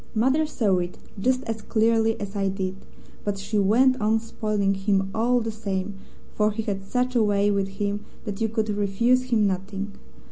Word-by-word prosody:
Mother 265 +8 +3
saw 200 -10 +1
it 175 0 -4 0.2
just 255 +5 +1
as 225 -1 -4
clearly 225 0 +2
as 200 0 -6
I 195 -1 +1
did, 190 -1 -3 0.5
but 205 -1 -1
she 205 +2 -1
went 250 +6 +4
on 220 +1 +3
spoiling 215 -3 -1
him 195 0 0
all 240 +2 +2
the 225 0 -2
same, 200 -2 -3 0.4
for 210 0 +2
he 220 +1 -3
had 195 -2 -3
such 250 +5 -1
a 235 - +5
way 205 -1 +3
with 200 -1 +1
him 200 +1 -3 0.2
that 205 0 -5
you 225 - +2
could 220 -1 -1
refuse 210 +5 +2
him 230 -4 +2
nothing. 195 +1 -2
210 Hz, 185 wpm, -25 LUFS, 195-225 Hz, 0.5 s, a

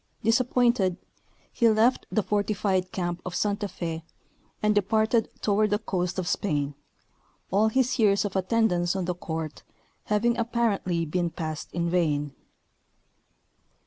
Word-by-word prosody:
Disappointed, 235 -4 +2 0.6
he 235 - +4
left 220 +4 +3
the 215 - +1
fortified 200 -3 0
camp 175 -1 -3
of 180 -1 -5
Santa 205 0 0
Fe, 165 -3 -5 0.6
and 210 0 +4
departed 220 +2 +2
toward 210 +1 +2
the 205 - +2
coast 185 -4 -2
of 185 -2 -2
Spain, 145 -7 -1 0.8
all 205 +4 +4
his 255 +3 +1
years 205 -2 +4
of 200 - -4
attendance 190 -3 +1
on 190 -2 -1
the 180 - -1
court 160 -3 -5 0.4
having 235 +3 +1
apparently 220 -7 0
been 175 +2 -1
passed 160 -2 -5
in 170 0 -1
vain. 150 -5 0
195 Hz, 130 wpm, -26 LUFS, 175-220 Hz, 0.8 s, he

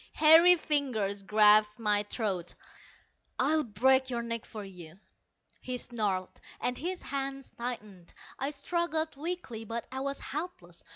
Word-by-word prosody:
Hairy 325 +3 +8
fingers 250 - -1
grasped 210 +1 +5
my 210 -2 +3
throat. 190 -7 -2 0.8
"I'll 305 +4 +2
break 260 +3 +2
your 235 -2 -2
neck 230 -1 -3
for 210 -2 -8
you," 180 -2 -12 0.6
he 255 -1 -4
snarled, 205 -7 -3 0.2
and 250 - -1
his 360 +7 -5
hands 275 -1 -4
tightened. 210 -7 -7 0.3
I 270 +1 -1
struggled 315 +2 -2
weakly, 295 -7 -5
but 230 +1 -4
I 265 - -4
was 275 +1 -3
helpless. 275 - -7
245 Hz, 130 wpm, -30 LUFS, 210-285 Hz, 0.8 s, Hairy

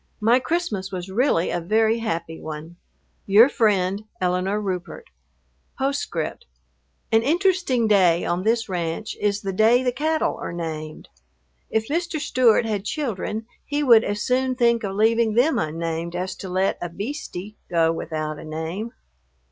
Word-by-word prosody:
My 230 +3 +4
Christmas 250 - -2
was 185 0 -5
really 210 -5 +2
a 175 - -1
very 220 +5 +2
happy 170 -7 -3
one. 155 +2 -7 0.5
Your 210 +5 +7
friend, 205 -4 +1
ELINORE 185 +3 0
RUPERT.... 195 - -5 1.2
An 225 - -5
interesting 330 - +2
day 180 -5 +4
on 175 +1 0
this 225 +3 +1
ranch 175 +2 -3
is 205 0 +1
the 195 -1 -2
day 225 +6 +4
the 250 - +1
cattle 310 +5 0
are - - -4
named. 155 -2 -6 0.6
If 220 0 0
Mr. 335 +1 -1
Stewart 245 -5 +3
had 210 -3 -2
children 220 -4 -3 0.2
he 295 0 -1
would 230 -5 +7
as 205 0 -2
soon 255 0 +1
think 235 -2 +2
of 195 -1 -3
leaving 225 +1 +3
them 270 +7 +3
unnamed 165 +2 -3
as 185 +1 -2
to 190 - -7
let 185 +2 0
a 175 - -3
"beastie" 205 - -6
go 165 -2 +3
without 155 -2 -4
a - - -9
name. 160 +9 -5
210 Hz, 150 wpm, -23 LUFS, 175-240 Hz, 1.2 s, Your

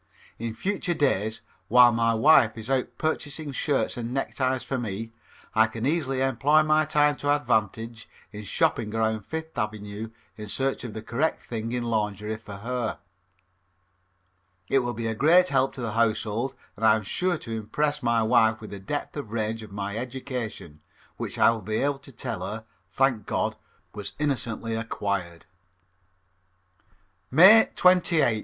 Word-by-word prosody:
In 115 -1 -4
future 185 - -2
days, 110 -7 0 0.3
while 125 +1 +7
my 115 0 +2
wife 120 -2 +5
is 115 +4 -6
out 130 -2 +1
purchasing 155 -1 -2
shirts 140 0 -1
and 120 0 -4
neckties 130 -1 -1
for 135 - -3
me, 110 0 -4 0.4
I 110 0 +5
can 115 +1 -5
easily 140 -3 0
employ 135 +4 +3
my 155 0 +3
time 150 -1 +2
to 145 - -3
advantage 115 -4 0 0.2
in 105 0 -8
shopping 105 +1 0
around 110 -2 -1
Fifth 160 0 -6
Avenue 105 -1 -4 0.3
in 105 -1 -7
search 135 +4 -1
of 120 -3 -7
the 110 - -6
correct 140 +8 0
thing 115 -1 -5
in 125 0 -2
lingerie 105 -2 -2
for 105 -2 -10
her. 120 +3 -3 1.7
It 135 - +4
will 120 -1 -3
be 115 +1 -4
a 110 - 0
great 170 +10 +5
help 135 -1 +2
to 130 - -8
the 115 -2 -2
household 115 +2 0 0.2
and 110 - -9
I 110 -1 +6
am 110 - -3
sure 180 - 0
impress 145 +7 -2
my 120 -2 +2
wife 110 -1 +3
with 110 - -10
the 100 - -7
depth 145 +10 -4
and 145 -7 -5
range 110 0 -2
of 110 -2 -11
my 100 +1 -4
education, 120 - -6 0.4
which - - -5
I - - +6
will 115 -1 -4
be 110 +2 -3
able 140 +3 0
to 135 - -12
tell 115 -5 -5
her, 110 +4 -5 0.2
thank 130 -6 +1
God, - - -1 0.4
was 105 -2 -6
innocently 120 -6 -2
acquired. 100 -6 -3 1.9
_May 190 - +8
28th. 170 -10 +4
115 Hz, 160 wpm, -26 LUFS, 110-140 Hz, 1.9 s, May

